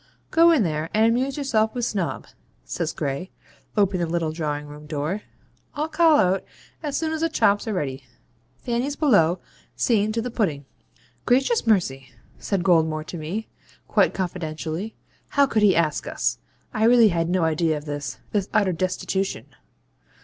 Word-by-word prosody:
'Go 335 +1 +6
in 315 -9 +4
there, 155 -2 -2
and 220 +1 +5
amuse 255 +4 +1
yourself 225 -6 +1
with 245 -1 -1
Snob,' 195 -7 -2 0.4
says - - -2
Gray, 140 +6 -3 0.5
opening 195 -3 +2
the - - -6
little 170 -2 0
drawing 150 -2 -3
room 150 +1 -11
door. 155 +7 -2 0.5
'I'll 305 +2 -2
call 315 -1 +5
out 190 -1 +2 0.4
as 290 -3 -2
soon 320 -1 -1
as 320 0 -3
the 330 - +2
chops 205 -8 +2
are 220 - -1
ready. 135 -5 -3 0.5
Fanny's 245 - -2
below, 195 - +3 0.4
seeing 215 -3 +2
to 225 - -1
the 240 +2 -3
pudding.' 160 - -1 0.6
'Gracious 265 - +2
mercy!' 135 -11 +1 0.3
says 195 -4 -1
Goldmore 160 -4 +2
to 175 - -7
me, 185 +9 -4 0.4
quite - - +2
confidentially, 175 +1 -4 0.3
'how 280 -1 +3
could 225 -5 0
he 205 -3 +5
ask 160 -2 0
us? - - -1 0.3
I 220 -1 +2
really 235 -2 +6
had 165 -2 0
no 180 -1 +1
idea 160 0 +1
of 150 - -9
this 145 -1 -5
this 200 -2 -1
utter 205 -3 +3
destitution.' 190 +2 -2
190 Hz, 165 wpm, -24 LUFS, 160-235 Hz, 0.6 s, Go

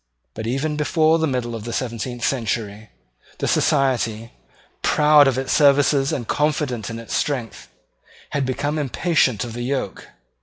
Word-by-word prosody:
But, 110 0 -6
even 145 +5 -1
before 160 +1 +2
the 160 - +1
middle 125 -3 -2
of 115 -2 -6
the 120 - -5
seventeenth 120 0 -3
century, 110 -4 -2 0.5
the - - -2
Society, 120 -5 +1 0.5
proud 150 -1 +5
of 130 -2 +1
its 130 0 -1
services 140 -1 +4
and 120 -5 -3
confident 145 -7 -1
in 115 - -5
its 115 -1 -8
strength, 125 -7 -3 0.6
had 140 - 0
become 140 +4 -2
impatient 135 - +1
of 120 -2 -7
the 120 - -5
yoke. 130 -5 -3
130 Hz, 150 wpm, -21 LUFS, 115-145 Hz, 0.6 s, proud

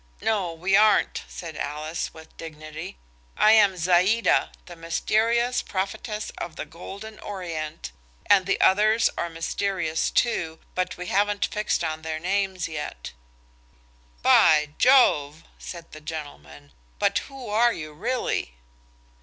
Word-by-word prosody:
No 200 -6 0
we 180 +4 0
aren't," 215 +1 +4
said 165 -3 -8
Alice, 150 +3 -4
with 160 0 -15
dignity. 155 - -8 0.4
"I 215 - +6
am 210 -3 +6
Zaïda, 185 +6 +3 0.2
the 175 - -10
mysterious 230 +9 +1
prophetess 210 +3 -4
of 160 - -6
the - - -5
golden 200 +7 -10
Orient, 165 -5 -6 0.3
and 195 -2 +4
the 195 - +1
others 215 +4 +4
are 170 - -2
mysterious 165 0 -1
too, 165 -9 0 0.2
but 185 0 -2
we 180 - -6
haven't 205 +2 +1
fixed 210 -4 -1
on 160 -1 -3
their 160 0 -4
names 190 +1 -1
yet." 150 - -6 1.1
"By 150 -1 +5
Jove!" 160 - +4 0.2
said 170 -2 -9
the 155 - -11
gentleman; 75 - -9 0.3
"but - - +2
who 270 -3 -10
are 235 +3 +4
you 155 -7 -7
really?" 230 - -2
180 Hz, 130 wpm, -25 LUFS, 155-210 Hz, 1.1 s, I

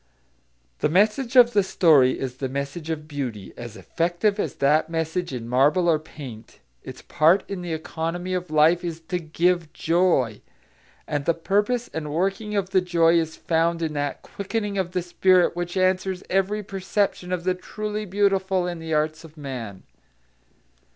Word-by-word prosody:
The - - +1
message 215 - +2
of 240 -1 +7
the 205 - +5
story 155 -9 +4
is 130 -1 -4
the 130 0 -3
message 140 +4 -5
of 155 -1 -4
beauty, 130 -9 -5
as 120 -2 -9
effective 175 +5 -1
as - - -2
that 150 +3 +2
message 165 +1 -2
in 120 -3 -5
marble 145 +9 +3
or 160 -2 +3
paint. 135 -7 -11 0.2
Its - - -10
part 160 +6 +3
in 195 -2 -5
the 175 -1 -5
economy 165 +3 -4
of 180 -2 -3
life 155 +3 +4
is 165 -2 -4
to 180 - 0
give 170 0 0
joy. 165 - +1 0.7
And 145 -1 -2
the 170 - +2
purpose 210 +8 0
and 150 -2 -4
working 195 +6 -1
of 195 -2 -1
the 190 -1 +4
joy 170 -2 +3
is 160 -1 -3
found 165 0 0
in 155 -1 -2
that 145 -1 -3
quickening 205 +1 -4
of 185 -1 -2
the 180 - -1
spirit 180 0 +3
which 175 +1 -4
answers 185 0 +1
every 195 +3 +1
perception 195 -1 -2
of 180 -2 -2
the 185 0 +1
truly 210 +3 -5
beautiful 195 -1 +1
in 175 -1 -4
the 160 -1 -2
arts 155 +1 -1
of 160 -1 -14
man. 125 -9 -7
170 Hz, 170 wpm, -24 LUFS, 155-190 Hz, 0.7 s, of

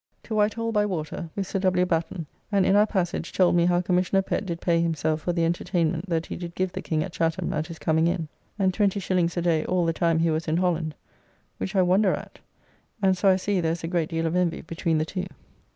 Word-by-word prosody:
To 225 - -6
Whitehall 215 +2 +1
by 210 -2 +2
water 170 -4 -4
with 200 - -2
Sir 195 - -2
W. 185 -1 +2
Batten, 165 -1 -2 0.3
and 200 -2 +3
in 195 - +4
our 210 +1 +5
passage 175 -5 -2
told 180 -2 +3
me 170 0 +4
how 175 0 +3
Commissioner 180 +2 +1
Pett 195 - -2
did 170 -2 -3
pay 170 -1 +2
himself 160 -1 0
for 175 - -1
the 170 -1 +1
entertainment 170 +1 -1
that 165 -1 0
he - - -6
did 170 -1 -7
give 185 -1 -1
the - - -5
King 155 -1 -1
at - - -6
Chatham 165 +2 -1
at 155 +1 -2
his 165 -2 -8
coming 160 +1 +2
in, 170 -2 -1 0.3
and 190 -2 +2
20s. 185 -4 +1
a - - +1
day 165 -3 +2
all 180 -1 +1
the 165 - +1
time 165 0 +1
he 165 0 +2
was 160 +1 -2
in 155 +1 +1
Holland, 170 -4 0 0.6
which 190 - -4
I 190 - +5
wonder 185 +2 +3
at, - - -10 0.6
and 190 -2 +3
so 195 +2 +3
I 190 - +6
see 190 0 0
there 165 -1 +1
is 170 - -7
a - - -2
great 170 -2 0
deal 165 0 -1
of 165 +1 0
envy 180 -2 +1
between 165 0 -1
the 155 - +1
two. 185 +2 -4
175 Hz, 245 wpm, -25 LUFS, 165-190 Hz, 0.6 s, I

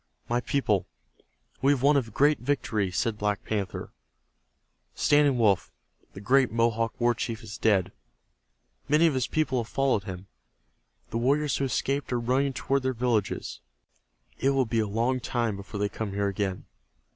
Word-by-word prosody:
"My 120 +1 0
people, 120 -9 0 0.7
we 140 +2 +4
have 130 -2 -3
won 145 +1 +5
a 140 - +4
great 140 +6 +2
victory," 115 -7 -1
said 105 +4 -1
Black 105 -1 -1
Panther. 100 -4 -3 1.0
"Standing 145 -3 +3
Wolf, 105 -6 +2 0.4
the - - -9
great 125 +4 +3
Mohawk 115 0 0
war 120 0 +3
chief, 115 -1 -4
is 105 -1 -8
dead. 100 -5 +2 1.0
Many 150 +3 +5
of 160 - +3
his 130 -2 0
people 145 -6 0
have 115 - -14
followed 135 -7 +1
him. 95 -1 -7 0.9
The 115 - -1
warriors 140 +2 +1
who 140 - 0
escaped 135 +1 -1
are 120 - +1
running 130 +3 +1
toward 135 +1 0
their 130 0 -1
villages. 115 -4 -1 0.8
It 135 - +2
will 135 -1 +2
be 115 0 -1
a 110 - +1
long 120 +5 0
time 120 -4 -1
before 100 +1 -7
they 105 - +1
come 100 0 -5
here 100 0 0
again. 95 -1 -3
120 Hz, 165 wpm, -27 LUFS, 105-135 Hz, 1.0 s, won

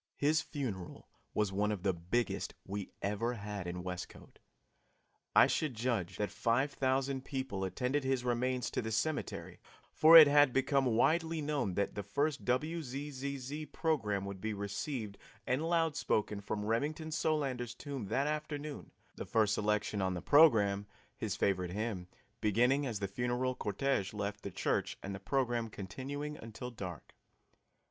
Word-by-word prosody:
His 155 +2 +3
funeral 125 - -5 0.3
was 105 -2 +1
one 105 +2 +1
of 100 -4 -4
the 95 -2 +2
biggest 90 +7 -1
we 100 0 -5
ever 110 +5 0
had 100 -3 -5
in 90 0 -4
Westcote. 90 -1 -7 1.0
I - - +9
should 150 -6 0
judge 110 -7 -1
that 105 -2 -1
five 125 +7 +1
thousand 130 0 0
people 130 -9 -3
attended 125 +10 -1
his 130 -2 0
remains 125 +1 0
to - - -1
the 110 -1 -4
cemetery, 150 +8 -2 0.3
for 165 +2 +9
it 155 -2 +12
had 145 -2 +5
become 135 0 +2
widely 165 +6 +2
known 145 - -1
that 100 - 0
the 105 - -3
first 140 +9 -1
WZZZ 140 0 -3
program 105 - 0
would 100 -1 -6
be 110 -1 -2
received 100 +2 -4 0.3
and 145 +6 0
loud 165 -3 +2
spoken 105 -5 0
from 105 +1 -3
Remington 150 +8 -1
Solander's 135 -7 -1
tomb 135 -6 -5
that 130 +7 +1
afternoon, 150 -1 -4 0.3
the - - -5
first 110 -2 +3
selection 105 -1 0
on 95 -1 0
the 85 - -4
program 105 -10 +5 0.3
his - - -3
favorite 90 -3 0
hymn 105 -4 -3 0.3
beginning 125 +7 +3
as 110 -5 -3
the 100 - 0
funeral 125 +5 -1
cortege 105 -2 -1
left 105 0 -3
the - - -5
church - - -1
and 100 - -4
the 95 - -6
program 120 0 0
continuing 140 +9 -5
until 115 +3 -7
dark. 90 - -8
120 Hz, 155 wpm, -34 LUFS, 100-140 Hz, 1.0 s, it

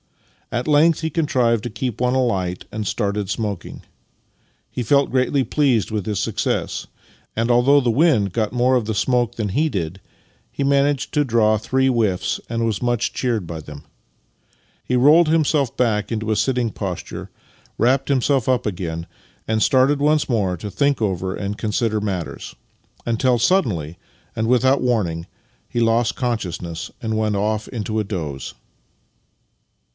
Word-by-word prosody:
At 120 +3 -2
length 155 +2 +4
he 160 - -1
contrived 125 -8 +1
to 120 - -3
keep 120 +1 -4
one 125 +1 +2
alight, 95 -9 -1
and 105 0 -4
started 100 -1 -1
smoking. 105 -4 -4 0.9
He 125 - -4
felt 140 +4 +2
greatly 130 +1 +2
pleased 130 -7 +1
with 105 -3 -2
his 105 -3 -1
success, - - -2 0.5
and 115 +1 +1
although 125 +4 +5
the 125 -4 +1
wind 115 - +3
got 110 0 0
more 125 +1 +2
of 125 - +2
the 110 0 -2
smoke 120 +1 +1
than 110 -3 -2
he 150 +11 +1
did, 90 - -4 0.5
he 140 - -3
managed 140 0 +1
to 150 - +3
draw 110 -4 +3
three 130 +5 0
whiffs, 110 -8 0
and 115 0 -1
was 110 -3 -1
much 120 -2 0
cheered 115 -7 -1
by 80 -1 -6
them. 75 -1 -11 1.0
He 125 - 0
rolled 155 +6 +6
himself 150 -4 +1
back 105 -4 +1
into 110 -1 -2
a - - +2
sitting 125 -1 0
posture, 95 -4 -6 0.5
v/rapped 135 +4 +2
himself 135 -2 +2
up 125 -1 +1
again, 85 -5 -3 0.4
and 110 -1 +1
started 135 +2 +3
once 150 +1 +2
more 100 -7 0
to 105 +5 -6
think 140 +2 +1
over 95 -3 -1
and 100 0 -4
consider 110 0 0
matters; 95 -5 -4 0.5
until 120 +2 +2
suddenly, 100 - +1 0.4
and 110 0 -1
without 130 +3 +3
warning, 95 -10 0 0.4
he 120 - -2
lost 115 +1 +2
con 120 -3 -1
sciousness 85 -3 -6
and 110 -2 -2
went 110 -1 0
off 110 +1 -1
into 110 -2 -3
a - - 0
doze. 80 -9 -5
115 Hz, 160 wpm, -21 LUFS, 105-130 Hz, 1.0 s, rolled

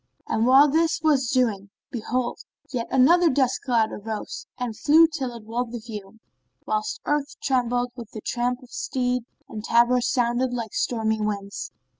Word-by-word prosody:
And 225 +1 +1
while 270 +3 +7
this 320 +3 +2
was 275 -6 +3
doing, 215 -7 +1 0.2
behold, 245 +1 -2 0.3
yet 235 -2 -2
another 330 +7 +5 0.3
cloud 230 -4 +1
of 205 - -8
dust - - -14
arose 220 -1 -5
and 245 -3 -3
flew 315 +8 +6
till 295 -6 -3
it 230 - -10
walled 230 +2 -3
the 240 - -4
view, 215 -2 -9 0.5
whilst 430 +1 -2
earth 295 -1 -1
trembled 245 -2 0
with 235 -4 -9
the 215 - -8
tramp 245 +3 -2
of 245 - -17
steed 250 -2 -1 0.2
and 215 -1 -7
tabors 240 +2 +3
sounded 245 +1 +1
like 230 -3 -4
stormy 220 -2 0
winds. 200 -1 -3
245 Hz, 165 wpm, -24 LUFS, 225-265 Hz, 0.5 s, while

